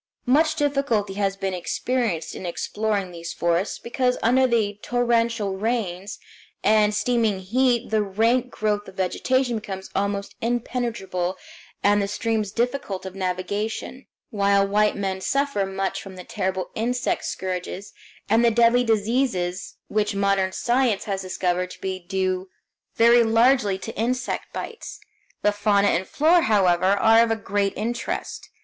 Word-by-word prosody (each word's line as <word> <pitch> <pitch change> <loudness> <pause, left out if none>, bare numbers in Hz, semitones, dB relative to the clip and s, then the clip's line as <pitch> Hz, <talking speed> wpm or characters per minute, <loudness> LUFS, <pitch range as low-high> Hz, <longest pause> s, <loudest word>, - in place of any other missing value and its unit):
Much 310 +5 +3
difficulty 275 -9 0
has 195 -1 -1
been 195 -1 -2
experienced 190 0 -2
in - - -8
exploring 200 +2 -2
these 170 -1 -7
forests, 170 +3 0
because 250 +1 -1
under 255 +3 +4
the 210 -4 0
torrential 230 -4 +1
rains 205 -3 -2 0.5
and 210 0 +4
steaming 225 -2 +1
heat 240 +6 +1
the 215 -1 +3
rank 225 +5 +1
growth 210 -2 -1
of 190 - -12
vegetation 245 +6 0
becomes 190 -3 -7
almost 200 0 -1
impenetrable, 230 -6 -2 0.5
and 205 0 +4
the 200 - -1
streams 215 0 -1
difficult 235 -4 -2
of 190 - -6
navigation; 195 +7 -3 0.2
while 200 -1 +3
white 210 +1 +2
men 190 -1 -3
suffer 275 -5 0
much 195 0 -2
from 195 -1 -10
the 180 - -9
terrible 185 0 -3
insect 245 +3 -1
scourges 185 +1 -4 0.3
and 225 +3 +3
the 235 - +6
deadly 235 +2 +4
diseases 215 -5 0
which 210 -1 0
modern 195 -1 +1
science 240 0 +1
has 195 -2 -3
discovered 180 -1 -1
to - - -11
be 190 -1 -3
due 185 +1 -2 0.5
very 235 +1 +6
largely 225 -3 +3
to - - -8
insect 250 +4 -2
bites. 455 - -7 0.4
The 210 - +4
fauna 205 -1 +2
and 185 +3 0
flora, 330 +4 +4
however, 185 - +3
are 220 +3 +5
of 220 -2 -2
great 200 0 0
interest. 235 +2 -4
210 Hz, 140 wpm, -24 LUFS, 190-235 Hz, 0.5 s, the